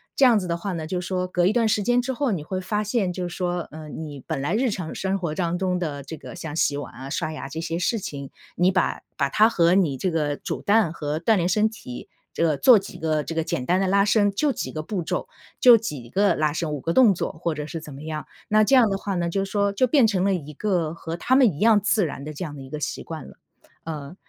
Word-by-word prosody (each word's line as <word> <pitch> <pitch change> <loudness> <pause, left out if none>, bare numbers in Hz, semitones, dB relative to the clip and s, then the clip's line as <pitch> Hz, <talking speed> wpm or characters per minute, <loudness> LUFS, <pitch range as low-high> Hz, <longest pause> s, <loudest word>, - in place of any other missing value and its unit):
这 275 - +2
样 235 -4 +6
子 185 - -5
的 170 - -1
话 185 +2 -4
呢， 160 -2 -4
就 180 +1 -2
说 180 0 -2
隔 180 -1 +1
一 195 - +3
段 230 -1 +2
时 215 -1 +1
间 245 +4 +2
之 260 +2 -3
后 265 0 0
你 170 -7 -2
会 185 +4 -3
发 210 +3 -1
现 205 -3 0
就 180 0 -3
是 175 - -8
说， 175 -2 -2
嗯 155 -1 -9
你 145 -3 -8
本 - - -2
来 145 +6 -1
日 250 +3 +2
常 180 -6 -4
生 190 0 -1
活 170 -5 -3
当 175 -1 -1
中 180 -1 0
的 145 -5 -4
这 160 +4 -8
个 165 - -10
像 160 -3 -6
洗 145 -3 +2
碗 145 - -7
啊， 130 +3 -8
刷 155 +2 -2
牙 155 -3 -6
这 160 - -5
些 165 0 -3
事 225 +5 +1
情。 140 -9 -6 0.3
你 180 +1 +4
把 185 - 0 0.2
把 140 - +1
它 215 +10 +5
和 170 -5 +3
你 160 -9 +2
这 185 +4 -1
个 150 -3 0
煮 - - -5
蛋 205 -4 +3
和 150 -2 -3
锻 215 +6 +3
炼 175 +1 +1
身 210 +3 +3
体， 200 - -9 0.3
这 - - 0
个 155 -2 +2
做 250 - +7
几 195 0 -6
个 155 -2 0
这 - - -5
个 165 0 0
简 125 -5 -3
单 180 +5 +2
的 195 - +1
拉 200 +1 +3
伸， 205 -1 +3
就 285 +9 +1
几 - - -4
个 155 - -5
步 190 +3 -3
骤， 160 - -3 0.3
就 245 -2 +9
几 145 - -6
个 200 +8 +2
拉 150 -1 +1
伸、 160 0 -2
5 150 - -3
个 165 +5 -2
动 235 -3 +6
作 - - -2
或 160 0 -3
者 150 -1 -4
是 160 +2 -6
怎 150 - -10
么 140 +2 -10
样。 155 -1 -5 0.2
那 215 0 +5
这 270 +6 +4
样 245 -4 +6
的 195 - -1
话 200 -2 -3
呢， 175 -1 0
就 195 +3 -1
说 200 0 0
就 255 +5 +2
变 265 -1 +4
成 195 -4 +1
了 195 - +2
一 150 -3 -7
个 170 -2 -1
和 165 0 -6
他 260 +8 +2
们 255 -6 +6
一 145 - -9
样 220 -1 +5
自 205 -1 +2
然 140 -2 -6
的 155 - -6
这 165 +5 -5
样 150 -3 -7
的 140 - -9
一 130 - -10
个 150 - -5
习 - - -4
惯 160 -1 -7
了。 - - -15 0.5
呃 150 0 -6
180 Hz, 300 characters per minute, -24 LUFS, 155-205 Hz, 0.5 s, 就